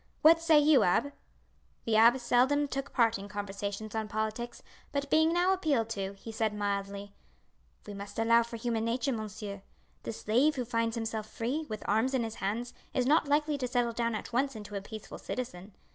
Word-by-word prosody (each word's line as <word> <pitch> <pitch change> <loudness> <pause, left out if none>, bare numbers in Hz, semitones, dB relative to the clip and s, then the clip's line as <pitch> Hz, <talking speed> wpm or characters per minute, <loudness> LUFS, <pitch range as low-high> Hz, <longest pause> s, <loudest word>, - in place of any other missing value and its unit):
What 325 +2 +7
say 330 -2 +5
you, 295 -1 +6
abbe?" 235 +11 +2 0.7
The 225 - +1
abbe 230 +4 +7
seldom 260 +4 +2
took 275 0 -4
part 230 -4 +2
in 200 - -8
conversations 205 +1 -5
on 220 -1 -2
politics, 220 +3 -4 0.3
but, 280 -1 -2
being 315 +1 +5
now 355 +2 +3
appealed 285 -12 0
to, 195 -3 -3
he 200 +3 -9
said 220 -1 -1
mildly: 200 0 -3 0.7
"We 205 - -7
must 200 +1 -8
allow 230 +1 +5
for 235 0 -5
human 230 -1 -1
nature, 240 +4 0
monsieur. 210 -2 -6 0.4
The - - -4
slave 245 +8 +2
who 250 -2 -2
finds 230 -1 0
himself 220 -2 -3
free, 280 +7 -3
with 215 -1 -6
arms 225 +6 +2
in 250 - +1
his 225 -1 -5
hands, 225 +5 -2 0.2
is 255 -2 +2
not 300 +3 +3
likely 295 0 +1
to 255 - -1
settle 245 -2 0
down 235 0 -1
at 215 - -6
once 270 +2 +1
into 210 -1 -9
a 200 - -2
peaceful 215 +1 -9
citizen. 200 -6 -6
230 Hz, 190 wpm, -30 LUFS, 210-265 Hz, 0.7 s, What